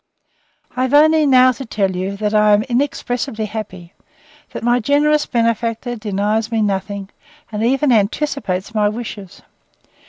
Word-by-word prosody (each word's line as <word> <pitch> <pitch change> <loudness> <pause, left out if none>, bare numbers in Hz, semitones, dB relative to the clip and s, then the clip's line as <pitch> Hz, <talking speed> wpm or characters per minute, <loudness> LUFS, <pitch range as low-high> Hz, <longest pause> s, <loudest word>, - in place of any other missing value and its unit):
I 255 - -2
have 260 +2 +1
only 310 0 +5
now 255 -1 +6
to 255 +2 -7
tell 195 -6 -1
you, 190 +2 -3
that 210 0 -2
I 210 0 +4
am 205 +1 +3
inexpressibly 245 -2 -2
happy: 195 -5 -8 0.6
that - - -7
my 240 +1 +2
generous 295 +4 +2
benefactor 230 +1 -1
denies 215 +1 -2
me 225 -1 +1
nothing, 195 0 -3 0.4
and 210 0 -4
even 270 +3 +2
anticipates 220 -3 -1
my 210 -1 +2
wishes. 210 -4 -8
225 Hz, 145 wpm, -18 LUFS, 205-255 Hz, 0.6 s, now